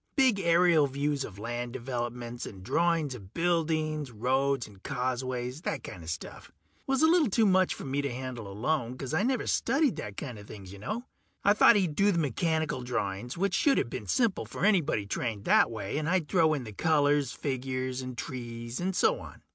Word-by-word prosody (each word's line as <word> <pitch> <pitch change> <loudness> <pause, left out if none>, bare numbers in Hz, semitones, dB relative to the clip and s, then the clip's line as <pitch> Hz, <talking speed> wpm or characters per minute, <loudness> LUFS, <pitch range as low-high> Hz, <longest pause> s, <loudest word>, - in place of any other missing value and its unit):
Big 260 -8 +4
aerial 170 -3 +4
views 140 +1 -1
of 100 -6 -8
land 120 +3 -4
developments, 120 -1 -4
and 95 -3 -10
drawings 165 - +1
of 100 -4 -12
buildings, 155 -4 0
roads 130 +3 0
and 100 -3 -16
causeways, 125 +2 -3
that - - -3
kinda 85 -3 -9
stuff. 85 0 -6 0.4
Was 270 +2 +2
a - - +7
little 325 -6 +4
too 220 +3 +3
much 185 -2 +3
for - - -8
me 140 +1 -1
to 140 -2 -2
handle 125 -3 -5
alone, 125 +3 -1
'cause 135 +2 -5
I 160 - +2
never 250 +2 0
studied 275 +2 +1
that 100 -1 -6
kinda 120 -8 -6
things, 100 -2 -10
ya 100 - -11
know. 215 - -4 0.4
I 200 - +6
thought 215 - +7
he'd 185 -7 +2
do 200 +4 +4
the 175 - 0
mechanical 160 -1 0
drawings, 120 - -3
which 195 +1 0
shoulda 275 +8 +3
been 115 -3 -6
simple 230 - +1
for - - -2
anybody 165 - +2
trained 105 0 -3
that - - +5
way, 110 +4 -3
and 155 +1 -2
I'd 180 -4 +1
throw 160 -3 +3
in 135 - -4
the 110 -3 -8
colors, 145 +1 +2
figures 130 -1 -3
and 130 -1 -7
trees 120 -2 -5
and 185 +1 -1
so - - +3
on. - - -12
135 Hz, 195 wpm, -29 LUFS, 120-170 Hz, 0.4 s, a